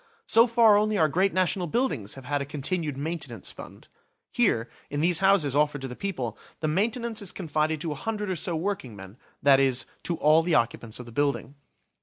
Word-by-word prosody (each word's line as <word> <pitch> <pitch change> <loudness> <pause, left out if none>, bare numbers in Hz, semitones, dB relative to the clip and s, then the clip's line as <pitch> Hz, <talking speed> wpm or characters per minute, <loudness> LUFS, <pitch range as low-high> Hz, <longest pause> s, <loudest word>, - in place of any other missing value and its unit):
So 230 +2 +5
far 230 -3 +5
only 215 0 +1
our 160 - +4
great 185 +6 +1
national 185 -1 0
buildings 150 - -1
have 135 -1 -11
had 145 +1 -1
a - - -3
continued 150 +1 -2
maintenance 160 +3 -4
fund. - - -12 0.5
Here, 185 - +2 0.2
in 145 - -3
these 170 +1 +3
houses 190 -8 +3
offered 145 -1 +1
to 135 - -4
the 125 - -8
people, 130 - -4 0.2
the 155 - -1
maintenance 220 +7 -1
is 200 - -3
confided 155 -3 -1
to 165 - -2
a - - -1
hundred 210 +5 -3
or - - -1
so 170 +1 -1
workingmen, 125 - -5 0.3
that 140 -1 +6
is, 130 -2 +2 0.2
to 170 - -1
all 155 +2 +5
the 165 0 +1
occupants 115 -1 -1
of 125 - -8
the 120 - -11
building. 140 +2 -1
155 Hz, 200 wpm, -26 LUFS, 140-195 Hz, 0.5 s, that